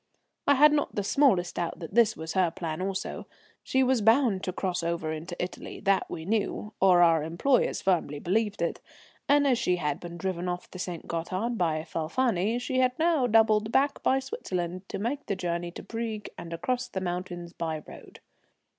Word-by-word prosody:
I 285 - +6
had 300 +2 +7
not 290 - 0
the 205 - 0
smallest 195 -7 +2
doubt 170 -1 -2
that 165 +2 -8
this 225 -1 +4
was 160 0 -5
her 185 -2 +3
plan 160 0 -5
also. 190 0 -4 0.3
She 265 0 +1
was 255 -2 +2
bound 225 -3 +3
to 185 - -1
cross 180 -1 -2
over 170 -2 -2
into 165 +3 -6
Italy, 180 +1 -5
that 195 -1 +2
we 160 - -6
knew, 210 +1 -1
or 180 -2 +6
our 165 -2 +5
employers 170 - +1
firmly 170 -6 +1
believed 205 +5 0
it, 170 - -2 0.5
and 285 0 +5
as 255 -4 +3
she 180 - +2
had 150 -5 -2
been 170 -1 -8
driven 180 -1 -2
off 180 0 -5
the 185 - -9
St. 175 -2 -5
Gothard 185 +8 -2
by 160 -6 0
Falfani 200 +6 0
she 255 +1 -1
had 255 -1 +2
now 320 -6 +2
doubled 220 -1 +4
back 275 +3 +2
by 265 - +3
Switzerland 185 - -4
to - - -3
make 250 +8 -3
the 200 - 0
journey 175 -1 -2
to 170 - -9
Brieg 225 -2 -4
and 170 - -8
across 245 +10 -2
the 190 - -4
mountains 175 -1 -4
by 160 -3 -3
road. - - -13
190 Hz, 190 wpm, -28 LUFS, 170-235 Hz, 0.5 s, had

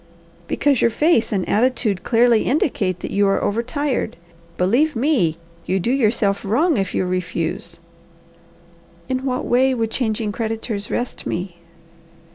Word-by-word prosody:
"Because 280 -4 +1
your - - +4
face 245 -2 +2
and 195 -3 -1
attitude 220 -4 +1
clearly 235 -1 +3
indicate 205 - 0
that - - -5
you 200 0 +2
are 195 - +2
over 215 +3 0
tired. 265 -2 -2 0.4
Believe 245 +12 +2
me, 230 - +1 0.3
you 190 - +1
do 230 +7 0
yourself 215 -6 +1
wrong 295 - +2
if 195 -2 -2
you - - +1
refuse." 170 -2 -3 1.3
"In 260 0 -2
what 255 -1 -1
way 260 +2 +3
would 225 -2 -1
changing 220 -3 -1
creditors 220 -1 -3
rest 245 - -3
me?" 180 0 -4
225 Hz, 140 wpm, -21 LUFS, 195-255 Hz, 1.3 s, your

